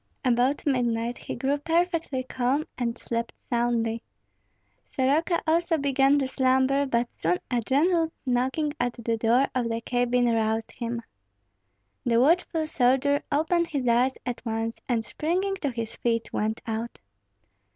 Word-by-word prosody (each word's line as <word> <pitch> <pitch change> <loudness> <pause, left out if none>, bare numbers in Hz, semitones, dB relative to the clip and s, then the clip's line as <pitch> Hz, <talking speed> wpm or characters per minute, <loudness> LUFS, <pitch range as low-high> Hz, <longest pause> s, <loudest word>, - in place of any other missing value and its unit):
About 250 +3 +2
midnight 240 -3 0
he - - -6
grew 275 +4 0
perfectly 330 -4 0
calm 260 +4 0
and 235 -1 -2
slept 235 0 -3 0.2
soundly. 235 -1 0 0.9
Soroka 300 +6 +1
also 330 +1 +2
began 275 0 +3
to 270 -2 0
slumber; 265 +2 +2
but 235 -2 0
soon 175 +2 0
a 240 -1 +1
gentle 325 +7 +2
knocking 265 +4 0
at 245 0 0
the 230 -1 -2
door 235 +4 +3
of 245 -2 0
the 225 0 -1
cabin 245 +1 +1
roused 225 -1 0
him. 235 -1 -4 1.0
The 235 -1 +3
watchful 320 +3 +2
soldier 280 0 +2
opened 330 +3 +2
his 280 -6 -2
eyes 245 +3 +3
at 245 -1 -4
once, 225 0 -3
and 230 -2 0
springing 375 +5 -1
to 295 -6 -2
his 230 -2 -5
feet 230 -1 -1
went 220 +1 -1
out. 225 +1 -4
250 Hz, 140 wpm, -26 LUFS, 235-285 Hz, 1.0 s, began